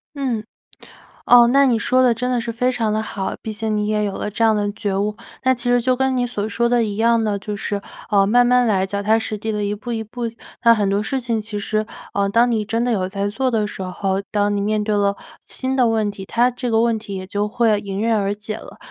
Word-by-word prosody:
嗯。 255 -6 -2 0.8
哦， 240 0 +8
那 280 0 +6
你 240 -3 +3
说 255 +3 +2
的 250 - +5
真 250 +2 -2
的 245 -2 +1
是 235 0 -4
非 250 +3 0
常 230 -4 -1
的 215 - 0
好， 195 -3 -4
毕 220 - -5
竟 215 0 -2
你 210 - 0
也 210 0 +1
有 200 - -2
了 210 - -4
这 230 - -1
样 220 -1 +4
的 205 -1 0
觉 205 -2 -2
悟， 210 +1 -1 0.3
那 260 0 +4
其 245 0 -3
实 245 0 +4
就 255 +2 +2
跟 265 0 +1
你 245 - +1
所 210 -4 -3
说 235 +3 +1
的 240 -1 +3
一 210 -2 -3
样 230 0 +3
的， 210 -2 0
就 205 +1 -5
是， 205 0 -3 0.3
呃， 200 -2 +4
慢 245 +4 +5
慢 250 0 +4
来， 195 -4 +2
脚 200 +1 -3
踏 220 +2 +3
实 215 -1 -4
地 220 +2 -3
地 210 -1 -2
一 205 +1 -1
步 230 +4 -7
一 225 -1 -2
步， 240 +3 -7 0.4
那 230 -1 +7
很 205 -3 0
多 200 +1 +1
事 265 +4 -2
情 230 -2 -1
其 210 -1 -5
实， 215 +1 -1 0.3
呃， 200 0 +2
当 235 +4 +3
你 220 -2 0
真 230 +2 -1
的 245 - 0
有 190 -5 0
在 200 +1 -2
做 255 +5 -1
的 215 -3 +1
时 190 - -6
候， 190 +1 -2
当 205 0 +1
你 - - -1
面 210 +1 0
对 210 0 0
了 200 0 +1 0.3
新 260 0 -3
的 250 -3 +4
问 220 -2 +1
题， 195 -1 -9
它 240 +5 +2
这 245 0 -4
个 225 0 +3
问 230 -1 +2
题 205 -2 -7
也 185 0 -6
就 205 +2 -1
会 225 -1 +2
迎 200 0 -4
刃 225 0 +2
而 200 0 0
解 215 +1 -6
了。 - - -12
220 Hz, 290 characters per minute, -20 LUFS, 205-240 Hz, 0.8 s, 哦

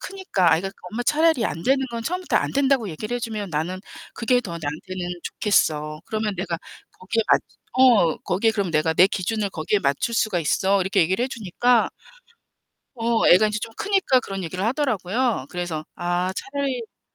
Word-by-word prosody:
크니까 375 - 0
아이가 180 +4 0 0.2
"엄마, 235 +3 -3
차라리 310 -3 +3
안 165 - -3
되는 270 +4 +2
건 235 -1 -4
처음부터 360 +7 -1
안 - - 0
된다고 270 -5 +2
얘기를 215 +8 -5
해 - - -1
주면 215 -3 -4
나는 165 +5 -2 0.3
그게 245 +1 +2
더 205 - -8
나한테는 175 +5 -5
좋겠어. 155 -7 0
그러면 215 -2 -2
내가 175 -2 -3 0.4
거기에 225 +5 0
맞 - - +5 0.4
어, 225 -11 +5
거기에 200 +6 +1
그럼 200 -5 -1
내가 155 +1 +2
내 180 - +7
기준을 200 +1 -2
거기에 170 +5 0
맞출 140 +8 0
수가 215 -6 +1
있어." 190 +5 +2
이렇게 190 +1 +1
얘기를 185 +7 +1
해 255 - 0
주니까 235 +1 +1 1.1
어 230 -1 +1
애가 210 +5 +6
인제 210 0 -2
좀 230 - -6
크니까 390 -10 +2
그런 195 -5 -6
얘기를 180 +3 -4
하더라고요. 235 - 0
그래서 175 -3 -4
아 175 +1 -1
차라리 270 0 -3
어 230 - -12
210 Hz, 380 characters per minute, -23 LUFS, 175-245 Hz, 1.1 s, 내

